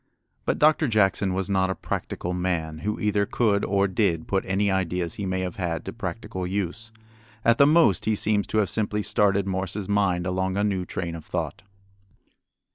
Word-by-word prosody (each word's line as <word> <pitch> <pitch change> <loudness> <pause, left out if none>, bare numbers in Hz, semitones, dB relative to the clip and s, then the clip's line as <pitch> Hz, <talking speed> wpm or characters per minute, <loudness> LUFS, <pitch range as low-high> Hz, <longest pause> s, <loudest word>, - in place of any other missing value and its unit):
But - - 0
Doctor 155 0 +4
Jackson 100 -3 +2
was 95 -1 -1
not 95 -1 +1
a 95 - -1
practical 90 - -4
man 85 -3 -2
who 105 +6 -3
either 105 -1 +1
could 105 -4 +1
or 100 0 +2
did 90 -4 0
put 95 -1 0
any 100 +1 +1
ideas 90 -3 -1
he 100 - -4
may 95 0 -1
have 90 -2 -4
had 85 -3 -2
to - - -5
practical 95 -1 -5
use. 100 +4 -3 0.5
At 115 0 +4
the 140 - +7
most 150 - +4
he 110 0 +2
seems 105 -1 +1
to - - -2
have 100 -4 +2
simply 105 -1 -1
started 100 -1 +2
Morse's 95 +1 -2
mind 100 -4 +1
along 95 +1 -1
a 100 - +1
new 95 -3 0
train 85 -2 -4
of 80 -2 -7
thought. - - -4
95 Hz, 190 wpm, -25 LUFS, 90-105 Hz, 0.5 s, the